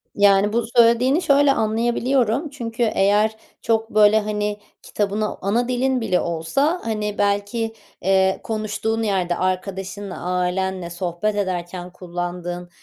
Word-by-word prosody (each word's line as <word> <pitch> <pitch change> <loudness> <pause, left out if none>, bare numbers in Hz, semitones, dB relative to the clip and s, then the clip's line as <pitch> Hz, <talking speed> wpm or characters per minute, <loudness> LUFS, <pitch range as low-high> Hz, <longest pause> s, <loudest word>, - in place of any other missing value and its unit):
Yani, 200 +1 +4
bu 235 - +1
söylediğini 240 +7 +5
şöyle 280 -1 +4
anlayabiliyorum. 240 +4 +1
Çünkü 235 -4 -3
eğer 210 0 +2 0.3
çok, 225 0 0
böyle, 215 0 +5
hani, 210 -1 -2 0.2
kitabını- 210 +1 -2
ana 230 +5 0
dilin 255 0 0
bile 180 -5 +1
olsa- 170 - 0
hani, 210 -2 -2
belki, 205 +3 0 0.3
eee, 190 0 +2
konuştuğun 220 +1 -2
yerde, 185 -4 0
arkadaşınla, 190 +1 -3
ailenle 180 0 -1
sohbet 175 +4 -2
ederken 180 -2 -3
kullandığın 175 0 -5
205 Hz, 115 wpm, -21 LUFS, 185-225 Hz, 0.3 s, söylediğini